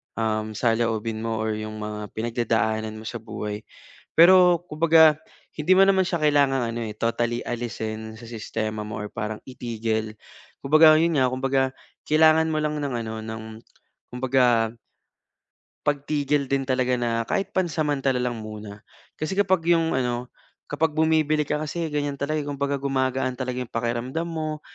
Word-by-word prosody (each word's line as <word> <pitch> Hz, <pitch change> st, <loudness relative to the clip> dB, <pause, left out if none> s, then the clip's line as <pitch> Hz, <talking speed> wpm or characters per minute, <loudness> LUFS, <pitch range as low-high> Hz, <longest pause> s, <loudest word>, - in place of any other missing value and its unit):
um, 110 Hz, -1 st, -1 dB
saloobin 115 Hz, -1 st, 0 dB
mo 110 Hz, -1 st, -2 dB
'yung 110 Hz, 0 st, -5 dB
mga 105 Hz, 0 st, -5 dB, 0.2 s
pinagdadaanan 110 Hz, -1 st, -1 dB
mo 110 Hz, -, -9 dB
sa 120 Hz, 0 st, -5 dB
buhay. 105 Hz, -1 st, -5 dB, 0.6 s
Pero 175 Hz, 0 st, +7 dB
kumbaga, 160 Hz, -1 st, +5 dB, 0.4 s
hindi 160 Hz, +5 st, +3 dB
mo 195 Hz, -, +7 dB
naman 190 Hz, -1 st, +3 dB
siya 170 Hz, -4 st, -2 dB
kailangang 140 Hz, -3 st, +3 dB
ano 120 Hz, -, -4 dB
eh, 105 Hz, -, -5 dB
totally 120 Hz, +1 st, -1 dB
alisin 110 Hz, -2 st, -4 dB
sa -, -, -13 dB
sistema 110 Hz, -1 st, -4 dB
mo 105 Hz, +1 st, -5 dB
or 105 Hz, -, -6 dB
parang 105 Hz, 0 st, -4 dB
itigil. 110 Hz, -3 st, -3 dB, 0.5 s
Kumbaga 155 Hz, +2 st, +7 dB
'yun 165 Hz, -1 st, +2 dB
nga, 130 Hz, -, +4 dB
kumbaga 135 Hz, 0 st, 0 dB, 0.4 s
kailangan 160 Hz, +1 st, +5 dB
mo 155 Hz, -, 0 dB
lang 150 Hz, 0 st, -1 dB
ng 140 Hz, -3 st, -3 dB
ano, 110 Hz, 0 st, -5 dB
ng 110 Hz, 0 st, -6 dB, 0.7 s
kumbaga 125 Hz, -3 st, +2 dB, 1.1 s
pagtigil 145 Hz, -1 st, 0 dB
din 135 Hz, -1 st, 0 dB
talaga 130 Hz, -1 st, +1 dB
na 115 Hz, -1 st, 0 dB
kahit 195 Hz, 0 st, -1 dB
pansamantala 150 Hz, -7 st, 0 dB
lang 120 Hz, -3 st, -2 dB
muna. 105 Hz, -1 st, -8 dB, 0.4 s
Kasi 155 Hz, +5 st, -2 dB
kapag 190 Hz, -4 st, +2 dB
'yung 165 Hz, -1 st, +3 dB
ano, 125 Hz, -1 st, -2 dB, 0.4 s
kapag 155 Hz, +1 st, 0 dB
bumibili 155 Hz, -1 st, +2 dB
ka, 150 Hz, 0 st, 0 dB
kasi 165 Hz, +2 st, -3 dB
ganyan 145 Hz, -1 st, -1 dB
talaga, 155 Hz, +2 st, -1 dB
kumbaga 140 Hz, 0 st, -1 dB
gumagaan 130 Hz, -1 st, 0 dB
talaga 125 Hz, -1 st, -3 dB
'yung 125 Hz, -, -5 dB
pakiramdam 120 Hz, +7 st, -2 dB
mo't 155 Hz, -2 st, -4 dB
130 Hz, 150 wpm, -24 LUFS, 115-155 Hz, 1.1 s, Pero